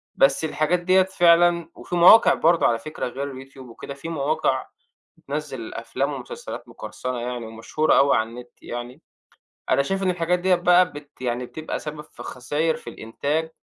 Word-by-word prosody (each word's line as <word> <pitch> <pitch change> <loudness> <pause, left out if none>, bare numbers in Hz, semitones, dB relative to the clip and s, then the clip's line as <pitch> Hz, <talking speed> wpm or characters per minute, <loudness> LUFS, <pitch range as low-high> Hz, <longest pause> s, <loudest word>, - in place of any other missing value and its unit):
بس 135 +3 +3
الحاجات 155 +3 0
ديّة 185 +2 +4
فعلًا 175 -2 +3
وفي - - -6
مواقع 180 +6 +8
برضو 170 +1 +3
على 115 -1 +2
فكرة 155 0 -5
غير 135 +1 -6
الYouTube 135 - -22
وكده، 130 +1 -9
في 140 +4 -8
مواقع 150 -3 0 0.5
بتنزّل 140 -5 -6
أفلام 135 +5 -3
ومسلسلات 130 -3 -8
مقرصنة 125 0 -6
يعني 120 0 -4
ومشهورة 115 +7 0
أوي 140 0 +5
على 110 0 -1
النت 120 +1 -10
يعني. 120 +4 -7 0.7
أنا 130 - +4
شايف 195 +6 -2
إن 190 - +2
الحاجات 180 0 0
ديّة 185 +1 +3
بقى 180 0 +4
بت 145 -2 -12
يعني 125 0 -2
بتبقى 155 +5 -5
سبب 150 0 -7
في 150 - -13
خساير 150 +6 -1
في - - -10
الإنتاج 150 +8 -3
145 Hz, 165 wpm, -23 LUFS, 125-170 Hz, 0.7 s, مواقع